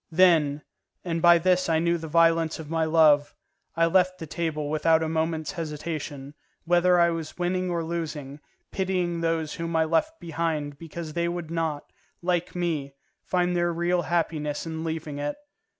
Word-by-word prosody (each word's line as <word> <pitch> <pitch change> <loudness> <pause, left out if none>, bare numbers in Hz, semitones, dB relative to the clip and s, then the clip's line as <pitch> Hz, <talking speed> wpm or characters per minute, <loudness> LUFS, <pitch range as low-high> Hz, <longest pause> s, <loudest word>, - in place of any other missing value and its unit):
Then, 160 -4 +4 0.4
and 165 -2 -2
by 175 0 +7
this 180 +1 +2
I 160 - +3
knew 170 +1 +1
the 160 - -6
violence 165 0 +3
of 155 -1 -9
my 165 -1 +1
love, 155 -2 +4 0.4
I 165 +1 +3
left 185 +2 +2
the 165 - -7
table 155 -2 -3
without 160 +2 +2
a - - -1
moment's 160 0 -1
hesitation, 150 -4 -5 0.3
whether 175 +1 +4
I 170 0 +4
was 165 -2 -5
winning 180 +1 -1
or 170 -1 -1
losing, 155 -4 -5 0.3
pitying 180 -3 -1
those 165 -2 -1
whom 165 0 -4
I 160 0 +3
left 170 - 0
behind 155 -3 -3
because 165 -1 -7
they 170 +1 0
would 170 -2 -4
not, 160 -3 -3 0.3
like 175 -1 -1
me, 155 -6 -2 0.3
find 180 -1 0
their 175 0 +1
real 175 +1 +1
happiness 160 -4 -1
in 160 0 -5
leaving 160 -3 -4
it. 145 0 -2
165 Hz, 165 wpm, -26 LUFS, 155-175 Hz, 0.4 s, by